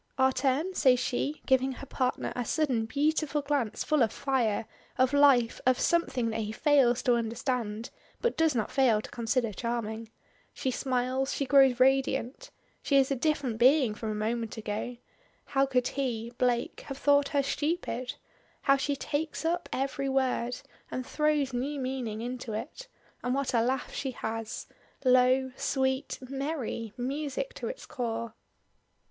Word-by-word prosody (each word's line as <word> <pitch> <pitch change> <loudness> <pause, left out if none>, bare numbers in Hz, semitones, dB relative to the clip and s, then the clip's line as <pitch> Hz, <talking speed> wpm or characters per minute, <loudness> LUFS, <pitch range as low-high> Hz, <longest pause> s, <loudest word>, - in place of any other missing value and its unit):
"Our 265 0 +4
turn?" 280 +8 0
says 255 -7 +4
she, 275 +4 -2
giving 265 0 +3
her 275 - -9
partner 255 -1 -1
a 245 - -1
sudden 245 -4 0
beautiful 295 +2 0
glance 280 -6 -1
full 305 -2 +2
of 225 -3 +3
fire 240 -6 0 0.3
of 260 +1 +3
life 275 -5 +4
of 255 0 +3
something 255 -9 +1
that 220 - -2
he 215 -1 -2
fails 255 -1 +3
to 250 - +4
understand, 230 -1 -2 0.3
but 475 - 0
does 320 -3 +2
not 225 - -1
fail 250 -6 +4
to - - -8
consider 235 -1 0
charming. 230 0 -3 0.5
She 260 - -1
smiles; 255 +1 -1
she 280 - -1
grows 270 -2 +5
radiant. 265 - +2 0.3
She 280 - 0
is 270 0 +3
a - - +2
different 270 -4 -1
being 255 -2 +5
from 220 +1 -5
a 215 - -2
moment 225 +1 -2
ago. 220 +3 -4 0.5
How 275 0 +2
could 250 -2 +1
he 235 -4 -3
Blake 245 -1 0
have 270 - -5
thought 285 0 +4
her 285 -2 +1
stupid. 275 -4 -2 0.5
How 275 0 +5
she 280 +1 -1
takes 305 +3 -3
up 345 +2 -1
every 275 +1 -1
word 255 -2 0 0.3
and 255 - -4
throws 300 -3 +1
new 275 +4 -2
meaning 255 -5 -3
into 245 -1 -5
it 265 - -6 0.4
and 250 +1 0
what 275 -1 -1
a 230 - +4
laugh 255 +2 -1
she 270 - -3
has! 225 -1 -4 0.4
Low 255 +1 +4
sweet 265 +1 -1
merry 270 -5 -3
music 285 - -3
to - - -5
its - - -6
core! 230 -4 -4
260 Hz, 160 wpm, -29 LUFS, 235-280 Hz, 0.5 s, grows